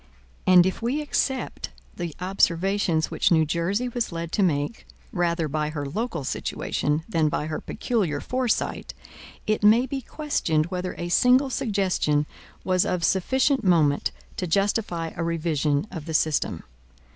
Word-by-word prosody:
And 180 -1 +7
if 190 - -2
we 245 +6 0
except 280 -3 -2 0.3
the 170 -4 -5
observations 180 -2 +1
which - - +2
New 160 -2 +4
Jersey 180 +10 -1
was 240 -3 -2
led 165 0 -5
to 205 - 0
make, 155 +2 0 0.2
rather 170 -5 0
by 150 +1 -1
her 150 -2 -4
local 170 - -3
situation, 150 +3 -2
than 160 -7 +1
by 150 -1 -2
her 155 0 -4
peculiar 190 -12 -1
foresight, 255 - -2 0.5
it 215 0 0
may 225 +4 +6
be 270 +1 -4
questioned 225 - -1
whether 180 0 -3
a 175 - -4
single 255 +7 +4
suggestion 190 - +1 0.4
was 185 -1 +2
of 180 -2 -1
sufficient 260 - +2
moment 160 -6 +3 0.3
to 180 - -2
justify 180 -2 0
a 170 - -2
revision 155 -2 0
of 165 -4 -7
the 160 - -2
system. 155 -1 0
175 Hz, 145 wpm, -25 LUFS, 160-220 Hz, 0.5 s, And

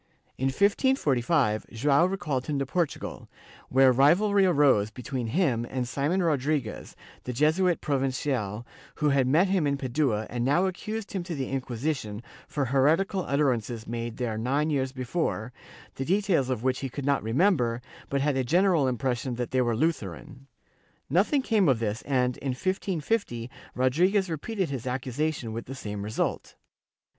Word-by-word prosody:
In 130 - -1
1545, 145 - +2
Joao 140 +8 +3
recalled 150 -9 -2
him 150 -2 -1
to 140 - -1
Portugal, 165 +3 -3 0.4
where 130 0 +5
rivalry 190 - +4
arose 140 - +4
between 125 +1 -5
him 130 -4 +1
and 125 -2 -2
Simon 150 +9 0
Rodriguez 145 -6 -1 0.3
the 125 - -3
Jesuit 160 +7 +2
Provincial, 130 -6 -1 0.3
who 150 - +1
had 135 -2 +3
met 165 +8 +3
him 185 -6 +2
in 140 0 0
Padua 130 -5 0
and 120 0 -3
now 145 +9 +3
accused 215 +3 -4
him 190 - -1
to 170 -2 -4
the 135 -3 -3
Inquisition 125 -4 -3 0.2
for 145 -2 -1
heretical 155 +9 +2
utterances 125 -5 0
made 115 0 -4
there 115 -3 -2
nine 140 +6 0
years 135 -2 0
before, 125 -3 -3 0.4
the 135 - -4
details 180 -5 +1
of 125 -3 -2
which 130 0 +1
he 135 - -4
could 140 +2 -6
not 140 -1 +2
remember, 120 - +2 0.3
but 140 0 0
had 145 0 +1
a 130 - +1
general 170 +1 +3
impression 125 0 -1
that 120 0 -4
they 130 - +2
were 120 -2 +1
Lutheran. 130 - -3 0.6
Nothing 285 -4 +3
came 210 - +3
of 130 - +3
this 110 0 -2
and, 125 -3 +1
in 135 -2 -2
1550, 175 - -2 0.2
Rodriguez 175 +9 +2
repeated 185 +2 -2
his 130 -2 -4
accusation, 130 0 -2
with 115 - -6
the 135 - -6
same 105 -5 -5
result. 105 +2 -3
135 Hz, 155 wpm, -27 LUFS, 125-165 Hz, 0.6 s, where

